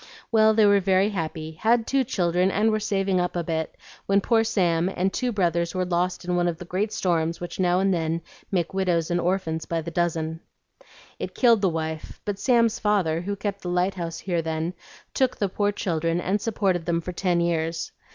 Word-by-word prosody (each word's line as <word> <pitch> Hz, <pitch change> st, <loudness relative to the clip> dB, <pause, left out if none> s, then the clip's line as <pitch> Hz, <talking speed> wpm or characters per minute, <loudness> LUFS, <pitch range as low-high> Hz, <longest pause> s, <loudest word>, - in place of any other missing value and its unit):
Well, 220 Hz, -1 st, +5 dB
they 215 Hz, -1 st, +5 dB
were 200 Hz, 0 st, +5 dB
very 190 Hz, +1 st, +3 dB
happy, 160 Hz, -4 st, -4 dB
had 225 Hz, +8 st, +2 dB
two 270 Hz, +2 st, +2 dB
children, 180 Hz, -6 st, +1 dB
and 215 Hz, +3 st, +2 dB
were 215 Hz, -, +1 dB
saving 195 Hz, -3 st, 0 dB
up 180 Hz, -, -2 dB
a 175 Hz, -, -1 dB
bit, 160 Hz, -1 st, -3 dB, 0.3 s
when 195 Hz, 0 st, +4 dB
poor 225 Hz, +2 st, +2 dB
Sam 175 Hz, -5 st, +1 dB
and 190 Hz, 0 st, -1 dB
two 250 Hz, -1 st, -1 dB
brothers 170 Hz, -4 st, 0 dB
were 185 Hz, 0 st, 0 dB
lost 180 Hz, +1 st, -1 dB
in 180 Hz, 0 st, 0 dB
one 175 Hz, 0 st, +2 dB
of 170 Hz, -2 st, -1 dB
the 180 Hz, -, -9 dB
great 195 Hz, +5 st, -1 dB
storms 165 Hz, -4 st, 0 dB
which 175 Hz, +1 st, -7 dB
now 180 Hz, -1 st, +3 dB
and 195 Hz, 0 st, +2 dB
then 165 Hz, -1 st, -1 dB, 0.3 s
make 175 Hz, -2 st, 0 dB
widows 180 Hz, -4 st, 0 dB
and 175 Hz, -, +1 dB
orphans 170 Hz, -3 st, -1 dB
by 165 Hz, -, -1 dB
the 165 Hz, +1 st, -5 dB
dozen. 160 Hz, -1 st, -1 dB, 0.8 s
It -, -, -5 dB
killed 235 Hz, -4 st, +4 dB
the 195 Hz, -, +3 dB
wife; 160 Hz, -1 st, -4 dB
but 205 Hz, -1 st, -3 dB
Sam's 230 Hz, -2 st, +3 dB
father, 185 Hz, -6 st, +1 dB
who 200 Hz, +3 st, -3 dB
kept 200 Hz, 0 st, -4 dB
the 180 Hz, -, -4 dB
lighthouse 180 Hz, -2 st, -1 dB
here 175 Hz, -3 st, -1 dB
then, 160 Hz, +2 st, -2 dB, 0.4 s
took 260 Hz, -2 st, +1 dB
the 200 Hz, -, +1 dB
poor 205 Hz, +2 st, 0 dB
children 165 Hz, -4 st, -1 dB
and 195 Hz, +4 st, -1 dB
supported 195 Hz, -6 st, 0 dB
them 170 Hz, -1 st, +1 dB
for 180 Hz, -, -5 dB
ten 180 Hz, -1 st, 0 dB
years. 165 Hz, -1 st, -1 dB
180 Hz, 205 wpm, -25 LUFS, 170-200 Hz, 0.8 s, Well